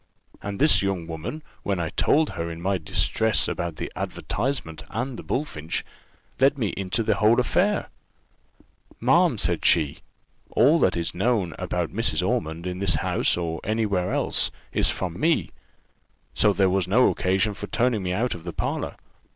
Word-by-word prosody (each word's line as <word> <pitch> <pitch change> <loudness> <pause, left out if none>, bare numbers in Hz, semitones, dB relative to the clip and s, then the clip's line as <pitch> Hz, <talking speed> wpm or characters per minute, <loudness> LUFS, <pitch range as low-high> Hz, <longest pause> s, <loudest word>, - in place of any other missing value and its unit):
And 100 0 -5
this 155 +7 +5
young 95 -4 -1
woman, 85 - -6 0.2
when 100 -3 -1
I 85 -2 -1
told 155 - +2
her 85 0 -4
my 95 +3 -1
distress 110 +7 +1
about 85 -2 -3
the - - -5
advertisement 105 - -3
and 125 +3 -3
the - - -7
bullfinch, 85 - -3 0.5
let 135 +2 +4
me 110 -6 0
into 95 +5 -2
the - - +2
whole 110 +1 +5
of - - +2
the - - +5
affair. 200 +10 +1 1.1
'Ma'am,' - - +3
said - - +1
she, 80 -5 +3 0.5
'all 145 +8 +4
that 90 - +2
is 85 0 -2
known 95 -2 0
about - - -2
Mrs. - - 0
Ormond, 80 +2 -2
in 90 0 -4
this 95 -4 +2
house, 75 - +1
or 80 -2 -3
any 110 +1 0
where 95 -3 0
else, - - +1 0.2
is - - +3
from 90 -2 -3
me; 165 0 +1 0.8
so 105 - +4
there 100 -1 +3
was 95 -1 +1
no 120 +7 +5
occasion 95 +4 +1
for 105 +1 -7
turning 120 -2 +1
me 90 -1 -2
out 115 +7 0
of 85 - -9
the - - -6
parlour. - - -3
95 Hz, 175 wpm, -25 LUFS, 85-120 Hz, 1.1 s, this